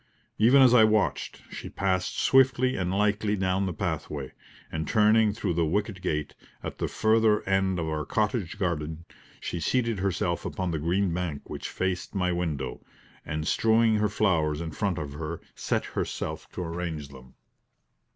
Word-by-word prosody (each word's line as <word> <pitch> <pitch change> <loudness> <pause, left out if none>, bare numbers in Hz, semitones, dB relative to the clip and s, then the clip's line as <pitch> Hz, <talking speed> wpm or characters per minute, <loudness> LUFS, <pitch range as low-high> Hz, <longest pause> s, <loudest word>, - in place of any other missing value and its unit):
Even 125 +5 +7
as 125 -2 +6
I 120 -3 +8
watched, 110 -1 +1
she - - -7
passed 95 -2 -1
swiftly 130 -1 +4
and 90 -2 -1
lightly 105 +1 +1
down 95 0 0
the - - -1
pathway, 75 -3 -3 0.4
and 80 -1 -3
turning 110 0 +4
through 100 -4 -2
the 85 0 +1
wicket 100 +2 -1
gate, 75 -5 -2 0.3
at - - -6
the - - 0
further 110 -1 +2
end 95 -1 +2
of 80 -2 -2
our 75 -1 -2
cottage 105 -3 -1
garden, 80 -4 -2 0.3
she 85 - -4
seated 115 +5 0
herself 90 -2 -1
upon 95 -2 -3
the 80 - -2
green 90 +3 +1
bank 85 -5 -3
which - - -5
faced 95 +1 -3
my 90 -2 +1
window, 85 -5 -3 0.4
and 75 0 -3
strewing 110 0 +3
her 105 0 +2
flowers 80 -7 +1
in 80 -1 -4
front 95 +1 -1
of 75 -3 -5
her, 80 +2 -5
set - - -1
herself - - -4
to 90 - -4
arrange 85 -4 -4
them. 65 -2 -14
95 Hz, 165 wpm, -27 LUFS, 80-105 Hz, 0.4 s, I